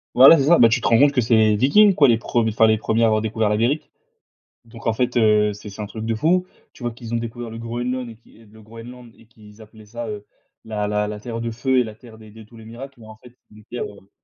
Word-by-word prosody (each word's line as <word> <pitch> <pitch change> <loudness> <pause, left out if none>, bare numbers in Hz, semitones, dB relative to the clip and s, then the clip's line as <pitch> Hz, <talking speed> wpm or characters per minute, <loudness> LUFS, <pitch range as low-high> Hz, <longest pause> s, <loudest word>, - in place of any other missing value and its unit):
Voilà, 135 +6 +8
c'est 140 - +1
ça, 170 +2 +6
beh, 115 - +7
tu 115 - 0
te - - -1
rends 115 - +4
compte 145 +1 +4
que 130 - +1
c'est 115 0 +1
les 110 -1 +3
Vikings, 190 - +4
quoi, 140 -5 +4
les 115 - +3
prem 115 0 -1
enfin, 110 +1 +3
les 110 0 +2
1ers 110 +2 -1
à - - +5
avoir 110 -1 +1
découvert 110 0 -1
l'Amérique. 115 +8 -1 0.8
Donc 115 0 -13
en 115 - +2
fait, 125 +2 -2
heu, 105 -2 +3
c'est 105 +1 -11
c'est 100 - -11
un 105 - -4
truc 110 +1 -8
de 115 0 -2
fou. 175 +10 +1 0.3
Tu - - -16
vois, 120 -1 -3
qu'ils 115 0 -8
ont - - +1
découvert 115 +1 -6
le 115 - -9
Groenland 120 +2 -4
et 115 - -13
qu'ils 115 -1 -22
le 110 +1 -17
Groenland 115 +2 -13
et - - -20
qu'ils 110 -1 -18
appelaient 110 0 -17
ça, 120 +2 -7
heu, 105 -1 -8 0.4
la 105 -2 -3
la 105 0 -1
la 105 0 -6
Terre 115 +1 -7
de 115 0 -4
feu 130 +3 0
et 125 - +2
la 110 -2 -9
Terre 110 0 -16
des 110 -1 -15
de 110 +1 -14
tous 115 +2 -17
les 110 - -14
miracles 130 +5 -10
mais, 110 - -14
en 110 0 -13
fait, 125 -1 -17 0.2
une 105 0 -17
terre, 120 +2 -6
heu 100 -1 -13
115 Hz, 285 wpm, -21 LUFS, 110-120 Hz, 0.8 s, Voilà